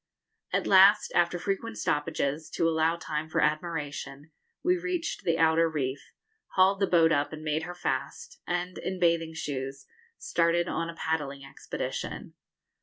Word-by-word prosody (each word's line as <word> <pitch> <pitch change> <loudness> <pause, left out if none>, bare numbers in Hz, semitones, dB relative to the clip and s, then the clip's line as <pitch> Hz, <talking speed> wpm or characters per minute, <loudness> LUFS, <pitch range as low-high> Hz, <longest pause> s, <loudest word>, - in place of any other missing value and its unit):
At - - 0
last, 195 +2 +6
after 175 0 +2
frequent 200 +5 -3
stoppages, 150 0 -1
to 165 - +2
allow 160 0 +2
time 155 -2 -4
for - - 0
admiration, 150 -2 -2 0.3
we 360 +1 +3
reached 355 -1 -3
the 165 -1 +1
outer 165 0 +4
reef, 140 -3 -2 0.5
hauled 190 +1 +4
the 195 - +2
boat 165 -2 +4
up 145 -2 +1
and 155 0 -8
made 155 0 0
her 175 +2 -6
fast, 140 -4 -4
and, 175 +1 -2
in 185 0 -4
bathing 165 -2 +1
shoes, 135 -3 -5 0.3
started 170 +1 +1
on 165 -1 -2
a 165 - -7
paddling 145 -4 -3
expedition. 135 0 -5
165 Hz, 150 wpm, -28 LUFS, 150-175 Hz, 0.5 s, last